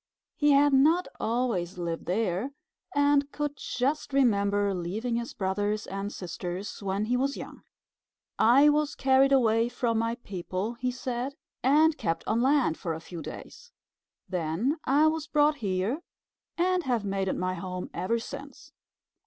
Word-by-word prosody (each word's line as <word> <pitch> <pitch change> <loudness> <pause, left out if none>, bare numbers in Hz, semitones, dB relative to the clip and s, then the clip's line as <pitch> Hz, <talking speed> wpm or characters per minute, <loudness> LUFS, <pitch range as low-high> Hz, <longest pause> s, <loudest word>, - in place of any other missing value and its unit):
He 295 - +2
had 285 0 +5
not 315 +7 +4
always 220 -7 -1
lived 170 -2 -4
there, 205 +6 -1 0.4
and 285 0 +3
could 295 -1 -3
just 275 +3 -2
remember 205 -6 +2
leaving 200 +7 -2
his 235 0 -5
brothers 205 +2 -1
and 195 +1 -4
sisters 180 +3 -6
when 200 +1 -1
he 245 +3 +1
was 275 +2 0
young. - - -9 0.8
"I 260 +6 +6
was 295 0 +1
carried 270 0 +4
away 230 -3 +3
from 230 -2 0
my 230 +1 0
people," 195 -1 -4
he 250 +1 -2
said, 250 +2 -4 0.3
"and 300 +4 +4
kept 165 -1 -1
on 225 +2 +1
land 265 - +2
for 165 -3 -3
a - - -6
few 165 0 -8
days. 480 - -10 0.6
Then 185 - -1
I 285 +4 +4
was 315 -1 0
brought 295 0 +3
here 200 - -1 0.6
and 365 +1 +2
have 245 -8 -1
made 195 -1 -1
it - - -1
my 185 0 -1
home 185 0 -5
ever 185 +7 0
since." 280 +4 -9
235 Hz, 155 wpm, -28 LUFS, 190-280 Hz, 0.8 s, I